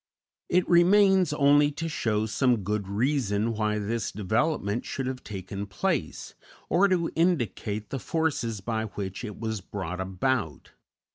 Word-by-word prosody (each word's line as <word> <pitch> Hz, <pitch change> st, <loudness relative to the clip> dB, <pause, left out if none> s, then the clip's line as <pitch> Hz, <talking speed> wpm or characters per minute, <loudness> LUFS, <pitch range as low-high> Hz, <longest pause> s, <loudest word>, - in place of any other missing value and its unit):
It 180 Hz, 0 st, +2 dB
remains 190 Hz, 0 st, +5 dB
only 145 Hz, 0 st, +4 dB
to 165 Hz, +3 st, -4 dB
show 110 Hz, -9 st, 0 dB
some 115 Hz, 0 st, +1 dB
good 105 Hz, 0 st, -2 dB
reason 115 Hz, -1 st, 0 dB
why 105 Hz, -1 st, 0 dB
this 105 Hz, 0 st, -2 dB
development 110 Hz, -, 0 dB
should 135 Hz, -, -4 dB
have 130 Hz, 0 st, -4 dB
taken 100 Hz, 0 st, -6 dB
place, 95 Hz, -, -2 dB, 0.4 s
or 190 Hz, +4 st, +4 dB
to 180 Hz, -3 st, +1 dB
indicate 115 Hz, -, 0 dB
the 135 Hz, -, -2 dB
forces 135 Hz, -10 st, -1 dB
by 110 Hz, +1 st, -2 dB
which 100 Hz, -1 st, -6 dB
it 105 Hz, -4 st, -7 dB
was 110 Hz, -2 st, -3 dB
brought 90 Hz, -2 st, -5 dB
about. 95 Hz, -, -2 dB
115 Hz, 140 wpm, -27 LUFS, 100-145 Hz, 0.4 s, remains